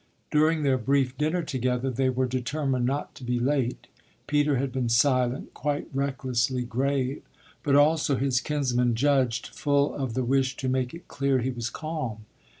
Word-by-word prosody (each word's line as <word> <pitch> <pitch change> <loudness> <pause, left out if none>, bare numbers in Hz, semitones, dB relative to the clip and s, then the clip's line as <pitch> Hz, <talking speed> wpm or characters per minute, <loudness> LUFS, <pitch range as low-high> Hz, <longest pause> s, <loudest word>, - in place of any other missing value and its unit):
During 155 +1 +3
their 135 -2 +2
brief 130 +2 +1
dinner 155 +4 0
together 130 -2 -1
they 130 +1 +1
were 130 0 +1
determined 130 +1 -1
not 140 +3 -2
to - - -12
be 125 0 -1
late 130 -1 0 0.4
Peter 145 -1 +2
had 135 +1 -1
been 125 -2 -1
silent, 125 +1 +2
quite 145 0 -2
recklessly 130 -2 0
grave, 135 +2 -1 0.4
but 140 -1 +2
also, 150 0 +4
his 130 -1 +1
kinsman 125 -5 +1
judged, 130 -2 +2
full 145 -1 +1
of 130 -5 -3
the 130 - 0
wish 135 +1 +1
to 130 - -3
make 130 +1 -1
it 170 +1 -12
clear 140 -1 +1
he 130 +1 -1
was 120 -2 -4
calm. 140 -10 -5
130 Hz, 165 wpm, -26 LUFS, 125-145 Hz, 0.4 s, also